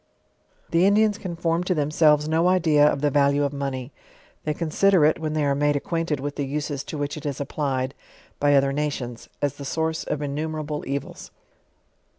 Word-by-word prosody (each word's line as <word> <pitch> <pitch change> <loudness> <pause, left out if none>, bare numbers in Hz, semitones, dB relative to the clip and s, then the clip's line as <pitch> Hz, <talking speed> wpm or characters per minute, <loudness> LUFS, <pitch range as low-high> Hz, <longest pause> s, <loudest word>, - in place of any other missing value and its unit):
The 170 +3 +4
Indians 210 0 +3
can 180 -3 -5
form 165 +1 0
to 180 - +1
themselves 150 0 +3
no 165 +2 +2
idea 160 -5 +4
of 140 - -3
the 145 -1 +2
value 140 +1 +3
of 140 0 -1
money; 135 -2 -4 0.5
they 155 - 0
consider 170 +1 +3
it, 155 - +2
when 155 -1 -3
they 155 -2 +1
are 140 - +2
made 145 +1 +1
acquainted 165 0 -1
with 145 +1 -5
the 145 - -1
uses 145 0 -3
to 155 - -6
which 145 +1 -3
it 150 - -9
is 140 -2 -3
applied, 135 -2 -2 0.5
by 145 0 +4
other 135 0 +3
nations, 135 -5 -3
as 145 0 0
the 140 - -7
source 160 +3 -2
of 150 - -3
innumerable 150 +1 -3
evils. 140 0 -5
150 Hz, 185 wpm, -24 LUFS, 140-160 Hz, 0.5 s, The